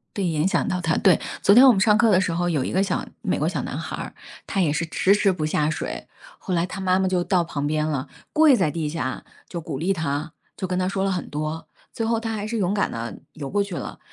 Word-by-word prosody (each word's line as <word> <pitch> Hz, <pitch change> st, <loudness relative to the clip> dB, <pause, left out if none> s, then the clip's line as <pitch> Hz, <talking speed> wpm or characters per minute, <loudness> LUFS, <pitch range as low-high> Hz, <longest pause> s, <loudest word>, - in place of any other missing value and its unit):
对， 200 Hz, -3 st, -1 dB
影 160 Hz, -1 st, +1 dB
响 185 Hz, -4 st, +1 dB
到 180 Hz, -, -1 dB
她。 165 Hz, -2 st, +1 dB
对， 185 Hz, -4 st, +4 dB, 0.2 s
昨 200 Hz, -, +6 dB
天 250 Hz, +4 st, +9 dB
我 255 Hz, -, +9 dB
们 195 Hz, -, 0 dB
上 210 Hz, +1 st, +4 dB
课 230 Hz, -, +4 dB
的 185 Hz, -1 st, +5 dB
时 185 Hz, -, 0 dB
候， 175 Hz, +1 st, 0 dB
有 150 Hz, -6 st, 0 dB
一 -, -, -3 dB
个 185 Hz, -, +2 dB
小 200 Hz, -, -1 dB, 0.2 s
美 -, -, -1 dB
国 -, -, 0 dB
小 -, -, -2 dB
男 -, -, -5 dB
孩 -, -, -5 dB
儿， -, -, -7 dB, 0.3 s
他 195 Hz, -, -1 dB
也 155 Hz, -5 st, +2 dB
是 165 Hz, +2 st, -1 dB
迟 185 Hz, +4 st, +2 dB
迟 200 Hz, -2 st, +3 dB
不 160 Hz, -4 st, -3 dB
下 155 Hz, -1 st, +1 dB
水， 155 Hz, -, -4 dB, 0.3 s
后 185 Hz, -, -3 dB
来 170 Hz, 0 st, +2 dB
他 190 Hz, +2 st, -6 dB
妈 185 Hz, 0 st, +2 dB
妈 190 Hz, -, +2 dB
就 180 Hz, -1 st, +1 dB
到 185 Hz, -3 st, +2 dB
旁 145 Hz, -4 st, -3 dB
边 150 Hz, 0 st, 0 dB
了， 145 Hz, -3 st, -2 dB, 0.2 s
跪 310 Hz, -3 st, +6 dB
在 180 Hz, -8 st, +1 dB
地 160 Hz, -2 st, -2 dB
下 150 Hz, -4 st, -4 dB, 0.2 s
就 170 Hz, -, -5 dB
鼓 155 Hz, -3 st, -5 dB
励 170 Hz, +8 st, 0 dB
他， 155 Hz, -2 st, -3 dB, 0.2 s
就 185 Hz, -, -4 dB
跟 180 Hz, 0 st, -1 dB
他 185 Hz, -, +1 dB
说 190 Hz, 0 st, -1 dB
了 195 Hz, -, +1 dB
很 180 Hz, -2 st, -3 dB
多， 155 Hz, +2 st, -4 dB, 0.3 s
最 225 Hz, -, -2 dB
后 230 Hz, 0 st, +1 dB
他 225 Hz, -1 st, -3 dB
还 210 Hz, -1 st, -3 dB
是 230 Hz, 0 st, -2 dB
勇 190 Hz, -1 st, +1 dB
敢 205 Hz, -, 0 dB
地 115 Hz, 0 st, -5 dB
游 140 Hz, -3 st, -7 dB
过 205 Hz, -, +1 dB
去 200 Hz, -3 st, -5 dB
了。 -, -, -6 dB
180 Hz, 295 characters per minute, -23 LUFS, 155-195 Hz, 0.3 s, 天